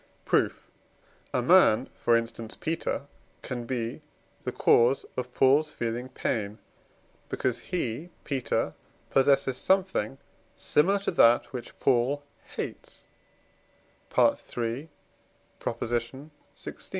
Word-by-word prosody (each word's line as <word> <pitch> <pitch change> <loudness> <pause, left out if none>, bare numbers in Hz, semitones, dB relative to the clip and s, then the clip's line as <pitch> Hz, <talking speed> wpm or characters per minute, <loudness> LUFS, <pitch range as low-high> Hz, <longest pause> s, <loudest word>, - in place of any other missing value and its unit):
Proof. - - +1 0.6
A - - 0
man, 115 +5 +6
for 120 -1 +3
instance 115 -1 -5
Peter, 160 -3 -2 0.4
can 120 -2 -4
be 125 +2 -3 0.4
the - - -1
cause 120 +3 +4
of 125 0 -4
Paul's 145 +3 +4
feeling 120 +1 -3
pain, 105 -5 -2 0.7
because 125 -2 -1
he 165 -2 -3
(Peter) 135 -3 -1 0.4
possesses 135 -1 +3
something 185 - +1 0.4
similar 190 +7 +3
to 200 - -2
that 120 -8 +4
which 125 -2 -7
Paul 135 +3 +2 0.3
hates - - -6 1.1
(III. 120 +5 +1 0.7
xvi.) 120 +5 -3
130 Hz, 95 wpm, -28 LUFS, 115-145 Hz, 1.1 s, man